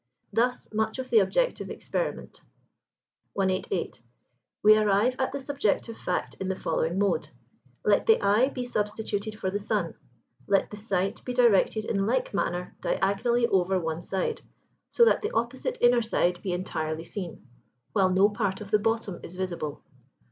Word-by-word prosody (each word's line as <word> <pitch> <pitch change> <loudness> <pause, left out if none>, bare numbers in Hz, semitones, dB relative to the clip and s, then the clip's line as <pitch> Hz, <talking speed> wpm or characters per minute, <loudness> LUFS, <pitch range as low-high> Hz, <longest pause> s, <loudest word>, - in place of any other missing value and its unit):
Thus 245 +2 +1
much 220 +2 0
of 260 -1 -6
the 450 - +7
objective - - 0
experiment. - - -4 0.9
188. 190 - -1 0.6
We 215 +1 +8
arrive 215 +3 +3
at 260 - 0
the 280 - -4
subjective 265 -5 -1
fact 180 - -2
in 190 - -3
the 190 - -1
following 165 0 -1
mode: 200 0 +1 0.6
Let - - +3
the 450 - +6
eye 215 +7 +3
be 250 -3 -4
substituted 210 -2 -2
for 190 - -1
the 205 - -1
sun: 205 -5 -1 0.5
let 195 -1 +2
the - - -6
sight 195 -2 -2
be 250 - -4
directed 220 -3 +3
in 195 -2 0
like 255 0 0
manner 180 -2 -2
[Pg - - 0
78] - - -12
diagonally 235 +5 +2
over 190 0 +2
one 160 -1 -3
side, 190 +1 -2 0.5
so 470 - +5
that - - +3
the 425 - -1
opposite 260 - -1
inner 240 0 +5
side 180 -5 0
be 190 - -3
entirely 160 -3 -3
seen, 175 - -7 0.5
while 195 -3 +3
no 190 +2 +5
part 205 -3 -2
of 205 -1 -9
the 210 - +4
bottom 225 -4 -1
is 175 - -9
visible. 170 -5 -4
205 Hz, 165 wpm, -27 LUFS, 185-235 Hz, 0.9 s, We